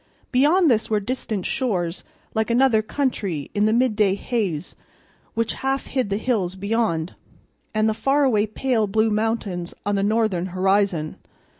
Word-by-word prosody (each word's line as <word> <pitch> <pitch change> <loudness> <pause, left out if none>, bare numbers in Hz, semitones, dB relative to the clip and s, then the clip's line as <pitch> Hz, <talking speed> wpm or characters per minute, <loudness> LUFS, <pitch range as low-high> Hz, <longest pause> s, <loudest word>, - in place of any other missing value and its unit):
Beyond 300 +5 +4
this 220 -2 +1
were 215 -1 +2
distant 215 -3 -3
shores 185 -9 -1 0.3
like 220 0 0
another 235 -2 +4
country 210 - -2
in 205 0 +2
the - - +2
midday 215 -5 +2
haze 200 -8 -3 0.6
which 230 0 0
half 270 0 -1
hid 255 -6 -1
the 200 - 0
hills 210 -6 -1
beyond, 200 -5 -1 0.6
and 215 0 +1
the 220 - +2
faraway 265 -4 +2
pale 225 0 0
blue 220 +2 +2
mountains 210 -5 -2
on 205 - 0
the 200 - +1
northern 205 -4 +1
horizon. 190 -3 +1
215 Hz, 145 wpm, -23 LUFS, 195-240 Hz, 0.6 s, Beyond